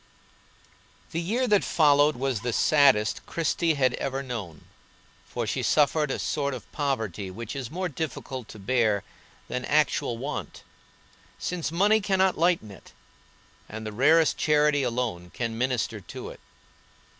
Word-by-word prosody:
The 165 - -2
year 230 +9 0
that 210 -3 +3
followed 145 -2 +4
was 130 -3 -2
the 120 -1 -2
saddest 140 -9 +3
Christie 165 0 0
had 130 -3 +2
ever 135 +1 -3
known, 105 - -6 0.6
for - - -3
she - - -2
suffered 150 0 +2
a - - -1
sort 140 -3 -1
of 120 - -11
poverty 110 - -2
which 115 +6 -7
is 130 -4 -4
more 185 +4 -2
difficult 135 -6 -5
to 110 - -11
bear 105 -1 +1 0.4
than 125 - -3
actual 140 -4 +1
want, 140 +5 -5 0.7
since 175 -3 -3
money 205 +6 +3
cannot 190 -2 +2
lighten 165 - +1
it, 95 - -15 0.8
and 110 +1 -7
the 110 - -4
rarest 155 +7 +4
charity 150 -1 +3
alone 115 -8 -2
can 115 -2 -2
minister 120 -2 -1
to - - -8
it. - - -11
135 Hz, 145 wpm, -26 LUFS, 115-155 Hz, 0.8 s, followed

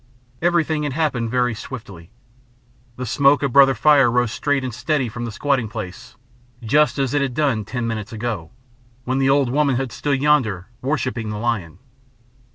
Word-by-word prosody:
Everything 165 -3 +1
had 145 -3 -2
happened 135 -7 -1
very 125 0 +1
swiftly. 100 -8 -9 0.9
The 125 - -5
smoke 140 +4 +3
of 135 -4 -1
Brother 135 -1 +6
Fire 140 +1 +5
rose 120 -1 +1
straight 145 +1 0
and 130 -2 -4
steady 135 +2 -1
from 120 +2 -5
the 115 - -5
squatting 130 -1 0
place, 105 -4 -8 0.5
just 150 +8 +2
as 135 -2 0
it 145 - +2
had 135 -3 -2
done 135 -8 0
ten 120 +2 -3
minutes 110 0 -4
ago, 110 -7 -4 0.5
when 130 +2 -1
the 135 0 +2
old 135 -3 +3
woman 140 -1 +2
had 130 -1 -2
stood 140 +2 -1
yonder 120 -11 +1
worshipping 130 -5 -2
the 105 - -4
lion. 105 -8 -2
125 Hz, 170 wpm, -21 LUFS, 115-140 Hz, 0.9 s, Brother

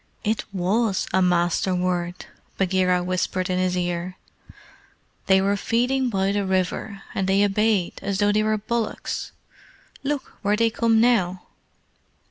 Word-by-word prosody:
"It 215 +1 -1
WAS 195 +2 0
a 190 - +3
Master 180 +1 +2
word," 180 -1 -2 0.3
Bagheera 185 -1 +2
whispered 185 0 -1
in 180 - 0
his 185 0 0
ear. 175 +1 -3 1.1
"They 190 0 +5
were 200 +1 +2
feeding 250 +5 0
by 195 -2 0
the 205 0 0
river, 190 +1 -2
and 190 - -1
they 195 +1 +4
obeyed 205 -2 +1
as 195 0 -2
though 205 +1 +3
they 210 +1 +2
were 215 0 +1
bullocks. 225 +1 -3 0.7
Look 285 0 -3
where 205 +1 +2
they 230 +1 +2
come 225 0 +2
now!" 190 -7 +2
195 Hz, 140 wpm, -23 LUFS, 185-215 Hz, 1.1 s, They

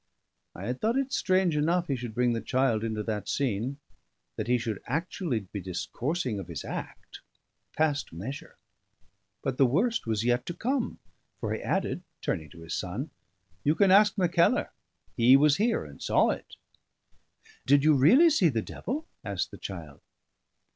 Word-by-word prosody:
I 95 - -7
had 125 +3 -3
thought 230 +4 +1
it 275 0 -1
strange 185 -3 +2
enough 170 +4 +2
he 140 - 0
should 120 -3 -6
bring 125 -1 +2
the 115 - -2
child 130 -4 +1
into 110 -2 -2
that 105 -2 -3
scene; 130 0 -1 0.6
that - - -4
he 125 0 +3
should 115 -4 -4
actually 160 - -2
be 100 +1 -7
discoursing 120 - -3
of 95 - -7
his - - -6
act, - - -7 0.6
passed 150 -2 +1
measure. 110 - -7 0.9
But 130 -1 -2
the 135 - +6
worst 215 - +1
was 110 -1 0
yet 120 0 +2
to 175 - -4
come: 255 +5 -1 0.4
for - - -2
he - - -4
added, - - -1 0.2
turning 80 -2 -3
to 85 - -14
his 80 +1 -6
son 105 - -4 0.5
"You 150 +2 +3
can 195 +3 +4
ask 205 +1 +6
Mackellar; 175 -2 +2 0.4
he 125 +3 +7
was 145 0 +4
here 225 - +1
and 70 -1 -13
saw - - +3
it." - - -7 1.1
"Did 140 +1 +5
you 155 0 +6
really 245 - +6
see 190 - +4
the 115 -6 -1
devil?" 305 +5 -5 0.2
asked 100 -5 -3
the - - -11
child. 80 -7 -8
135 Hz, 170 wpm, -28 LUFS, 110-175 Hz, 1.1 s, he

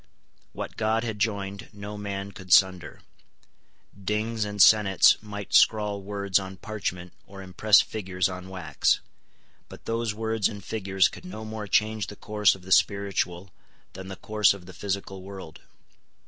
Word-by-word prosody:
What - - -7
God 110 +1 +1
had 110 -3 -4
joined 100 0 -2
no 105 +1 -8
man 100 -1 -5
could 95 -3 -11
sunder. 95 -2 +3 0.9
Dings 105 +3 -2
and 105 0 -6
senates 100 -1 +6
might 105 -1 -8
scrawl 105 -2 +4
words 100 -1 0
on 95 0 -8
parchment 95 -5 -5
or 95 0 -10
impress 100 +3 +4
figures 95 -4 -2
on 90 0 -8
wax; 95 -3 0 0.7
but - - -13
those 115 -2 -2
words 110 -1 0
and 100 -3 -9
figures 95 -3 +1
could - - -11
no 145 -12 -8
more 110 -1 -6
change 110 0 +1
the 105 - -9
course 105 -1 +2
of 95 - -15
the 95 - -11
spiritual 95 -2 +1 0.4
than 95 0 -9
the 95 - -7
course 105 0 +2
of 95 -3 -13
the 95 - -11
physical 95 +1 -4
world. 95 -4 -10
100 Hz, 155 wpm, -26 LUFS, 95-105 Hz, 0.9 s, senates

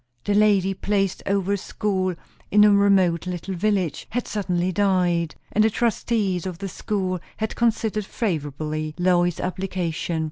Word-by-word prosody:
The 205 - 0
lady 200 -2 +4
placed 195 -1 -1
over 200 0 +1
a - - +1
school 185 -2 -1 0.3
in 210 +1 +6
a 210 - +7
remote 195 -4 +3
little 180 +1 -4
village 185 -4 -1
had 245 +2 -2
suddenly 185 -3 -1
died; 180 -4 +1 0.2
and 215 - +3
the 220 - +4
trustees 210 -5 0
of 180 -2 -5
the 195 +1 -5
school 185 -1 -2 0.2
had 220 0 -3
considered 220 -3 0
favourably 155 - -3
Lois's 175 -1 +2
application. 180 -3 -2
190 Hz, 145 wpm, -23 LUFS, 175-205 Hz, 0.3 s, a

